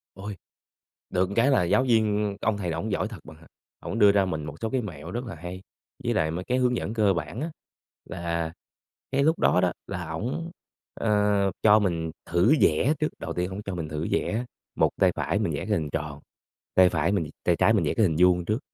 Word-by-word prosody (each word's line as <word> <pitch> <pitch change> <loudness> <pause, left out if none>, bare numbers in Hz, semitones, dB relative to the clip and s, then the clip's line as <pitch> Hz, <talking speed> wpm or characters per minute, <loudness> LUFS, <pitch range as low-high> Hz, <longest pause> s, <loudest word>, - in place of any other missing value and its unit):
Ôi! 100 +2 -6 0.7
Được 90 0 +1
cái 120 +5 +4
là 130 - +4
giáo 90 +9 +3
viên 110 -4 +2
cái - - -2
ông 110 -2 +2
thầy 90 -4 -2
ổng 85 +7 -3
giỏi 100 - 0
thật 105 -4 -9
bạn 80 0 -12
ạ. 80 - -18 0.3
Ổng 115 - -4
đưa 105 -1 +7
ra 100 -1 +3
mình 80 -5 -3
một 70 - -7
số 110 - -1
cái 130 0 0
mẹo 85 -10 -7
rất 120 +2 -4
là 110 - -7
hay, 90 +3 -7 0.4
với - - 0
lại 80 0 +1
mấy 90 +3 -4
cái 125 - 0
hướng 125 -1 +2
dẫn 110 - -3
cơ 105 -4 +3
bản 85 - -4
á, 165 +2 -3 0.6
là 85 -1 -3 0.6
cái 140 +1 +2
lúc 160 +3 +2
đó 90 - +4
đó 90 -1 +2 0.2
là 90 -4 -5
ổng, 125 - -3 0.4
ờ, 105 -2 +2
cho 110 0 +7
mình 85 -5 -1
thử 90 - +3
vẽ 100 - +4
trước. 155 - +2
Đầu - - -4
tiên 90 +1 -1
ổng 95 +2 -6
cho 95 -2 -4
mình 80 -3 -4
thử 75 +1 -3
vẽ, 115 +4 0 0.3
một - - +3
tay - - +6
phải - - -1
mình - - -1
vẽ - - -2
cái - - -6
hình 75 -3 0
tròn, 75 -2 -4 0.6
tay 95 -1 +7
phải 80 +2 +1
mình 85 -7 0
tay - - +3
trái - - +4
mình - - +2
vẽ - - +1
cái 110 - +3
hình 80 -4 +1
vuông 90 -1 +4
trước. 105 +5 0
95 Hz, 235 wpm, -26 LUFS, 85-110 Hz, 0.7 s, đưa